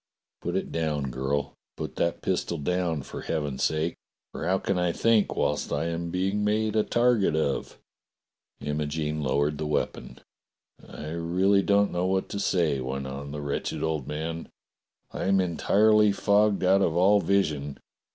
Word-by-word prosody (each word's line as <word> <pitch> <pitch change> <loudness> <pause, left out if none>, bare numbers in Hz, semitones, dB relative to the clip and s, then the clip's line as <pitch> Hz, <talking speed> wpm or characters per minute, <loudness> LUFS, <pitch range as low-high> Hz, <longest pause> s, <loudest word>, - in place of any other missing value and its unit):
"Put - - -3
it - - -2
down, 75 -4 -1
girl! 65 +3 -2 0.2
Put - - -5
that 85 - -1
pistol 85 - -1
down 85 -1 -1
for - - -7
heaven's 70 -3 -3
sake, 80 +2 +1 0.4
for 80 - -5
how 95 +1 +3
can 95 -1 -1
I 90 -1 +1
think 115 +2 +2
whilst - - -1
I 80 +3 0
am 85 +1 -3
being 95 +4 0
made 110 +1 +1
a 110 - +4
target 120 -8 +2
of?" 75 -3 -1 0.8
Imogene 75 +1 -2
lowered 70 +2 0
the 75 - -2
weapon. 75 - -2 0.7
*'I 75 - -8
really 90 +5 +2
don't 100 +1 +3
know 90 +1 0
what 95 0 0
to 100 - -4
say," 85 -8 +1
went 65 +1 -4
on 70 +2 -6
the 75 +1 -5
wretched 70 -1 -3
old 80 -4 -2
man. 80 +2 -4 0.6
"I - - -4
am 95 0 +3
entirely 105 +4 +4
fogged 100 0 +2
out 95 +2 +4
of 85 -4 +1
all 100 +4 +5
vision. 75 -9 0
85 Hz, 160 wpm, -27 LUFS, 75-100 Hz, 0.8 s, all